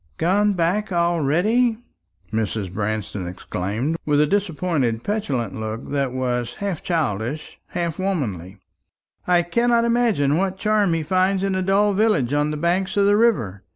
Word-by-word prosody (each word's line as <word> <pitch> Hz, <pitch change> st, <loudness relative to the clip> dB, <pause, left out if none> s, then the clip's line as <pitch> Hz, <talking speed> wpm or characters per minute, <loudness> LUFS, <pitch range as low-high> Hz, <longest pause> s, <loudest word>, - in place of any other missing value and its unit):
"Gone 205 Hz, +4 st, +2 dB
back 185 Hz, +4 st, 0 dB
already!" 175 Hz, -, +2 dB, 0.6 s
Mrs. 105 Hz, -4 st, -2 dB
Branston 105 Hz, -2 st, -3 dB
exclaimed, 105 Hz, -, -3 dB
with 145 Hz, -1 st, +2 dB
a 150 Hz, -, +5 dB
disappointed 160 Hz, -, 0 dB
petulant 140 Hz, -, -2 dB
look 110 Hz, +1 st, -5 dB
that 140 Hz, -3 st, 0 dB
was 125 Hz, -2 st, -2 dB
half 200 Hz, -6 st, -3 dB
childish, 145 Hz, -, -2 dB
half 170 Hz, -2 st, -3 dB
womanly. 110 Hz, -, -3 dB, 0.7 s
"I 175 Hz, -1 st, +4 dB
cannot 235 Hz, +6 st, +2 dB
imagine 225 Hz, -, +2 dB
what 190 Hz, +1 st, -1 dB
charm 210 Hz, -4 st, +2 dB
he 165 Hz, -, -1 dB
finds 185 Hz, +4 st, +1 dB
in 195 Hz, -1 st, 0 dB
a 190 Hz, -, 0 dB
dull 200 Hz, +2 st, +2 dB
village 195 Hz, -, +2 dB
on 145 Hz, +1 st, +1 dB
the 150 Hz, -, -3 dB
banks 180 Hz, +5 st, 0 dB
of 200 Hz, -, +4 dB
the 205 Hz, 0 st, +4 dB
river. 120 Hz, -, +1 dB
170 Hz, 150 wpm, -22 LUFS, 125-195 Hz, 0.7 s, a